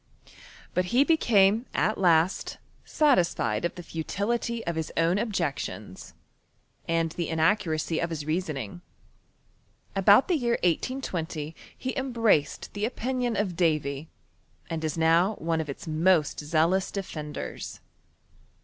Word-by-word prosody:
But 180 0 0
be 250 +3 +5
became 230 -8 +3
at 215 - +2
last 175 -1 +2 0.3
satisfied 175 - +2
of 170 - -2
the 175 - -8
futility 225 +8 -2
of 170 - -2
hii 160 -1 -2
own 170 +4 +3
objections, 140 - -4 0.7
aud 165 -1 +1
the 170 0 -3
inaccuracy 160 -1 +1
of 170 - -1
his 155 -3 -4
reasoning. 150 - -3 1.1
About 200 +5 +6
the 355 - +2
year 240 -3 +1
1S20 165 - -2 0.2
he 260 - -4
embraced 230 - +1
the 205 +1 -1
opitiioD 245 -3 -2
of 190 -4 -1
Davy, 155 -3 0 0.6
and 160 -1 -3
is 155 0 -2
now 165 +6 +3
one 165 0 -1
of 155 - -7
its 140 - -7
most 160 0 +2
zealous 165 +5 +1
defenders. 155 -7 -6
170 Hz, 120 wpm, -27 LUFS, 160-210 Hz, 1.1 s, About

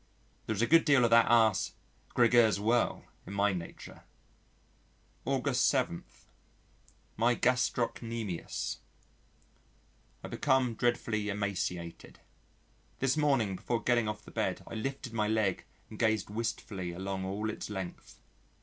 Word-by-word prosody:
There 110 - -1
is 110 - 0
a - - +5
good 165 +6 +5
deal 140 -5 +4
of 115 - +1
that 115 -1 +6
ass, 110 -4 +4 0.4
Gregers 120 -3 +5
Werle, 115 +4 +1 0.2
in 95 - -6
my 100 0 +2
nature. 85 -2 -8 1.2
August - - +1
7. 85 - 0 1.1
My 120 +2 +3
Gastrocnemius 115 -6 -1 1.4
I - - -5
become 130 -4 +1
dreadfully 115 -3 0
emaciated. 95 -4 -4 0.8
This 135 0 +1
morning, 135 -10 +2
before 115 +3 -2
getting 120 -3 +2
off 105 0 -5
the - - -12
bed - - -2
I - - -10
lifted 130 +2 -4
my 105 -2 +1
leg 110 -3 0 0.3
and 110 - -9
gazed 110 -3 +1
wistfully 105 -5 -3
along 95 +1 -4
all 105 +3 -2
its 110 - -7
length. 95 -4 -7
110 Hz, 125 wpm, -31 LUFS, 100-120 Hz, 1.4 s, that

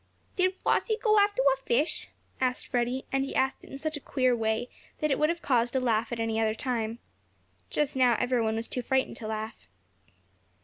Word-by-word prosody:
"Did 370 0 +2
Flossie 440 -2 +2
go 430 -2 +4
after 405 -9 +3
a - - -5
fish?" 270 +4 0 0.3
asked 255 -1 0
Freddie, 245 +2 -1
and 270 0 +1
he 275 - -5
asked 265 0 +1
it - - -13
in 275 - -7
such 310 +1 -3
a - - -7
queer 255 -2 +1
way 220 +1 0 0.3
that 305 -1 +1
it 270 - +1
would 305 - +3
have 340 0 -2
caused 240 -1 +2
a - - +4
laugh 230 -2 +1
at 235 - -3
any 225 -1 0
other 220 -1 +1
time. 230 -2 -2 0.7
Just 295 -1 0
now 250 -2 +4
every 250 -1 +1
one 220 0 0
was 225 +1 -2
too 250 - -2
frightened 265 +2 0
to 220 - -6
laugh. 220 0 -5
255 Hz, 210 wpm, -28 LUFS, 230-275 Hz, 0.7 s, go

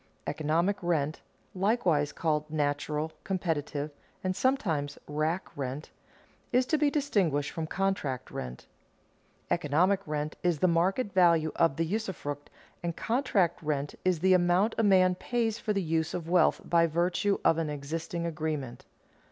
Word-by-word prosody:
Economic 165 +6 0
rent 160 -4 0 0.3
(likewise 185 -7 +1
called 155 -2 -1
natural, 150 +1 -1
competitive, 155 -5 -2 0.3
and 185 0 0
sometimes 170 - 0
rack 155 +5 -2
rent) 135 +2 -5 0.6
is 250 +1 +3
to 310 - +1
be 300 -1 +3
distinguished 195 - +1
from 160 -1 -4
contract 155 -10 -2
rent. 65 0 -6 0.9
Economic 170 +5 +2
rent 150 0 -2
is 175 -3 +1
the 185 - +3
market 190 +6 +1
value 170 -4 +4
of 165 -5 +3
the 165 - 0
usufruct, 165 -7 -4 0.3
and 170 -1 -3
contract 225 - +1
rent 145 -2 -2
is 180 -4 +1
the 190 +1 +5
amount 180 +4 +3
a - - +3
man 185 -3 +5
pays 230 +3 -1
for 215 - -2
the 200 -2 0
use 160 -1 0
of 170 -2 -4
wealth 175 -1 +3
by 170 -1 +4
virtue 175 +5 +1
of 165 - +4
an 160 -2 -1
existing 160 +4 -4
agreement. 155 -6 -4
170 Hz, 145 wpm, -29 LUFS, 150-190 Hz, 0.9 s, the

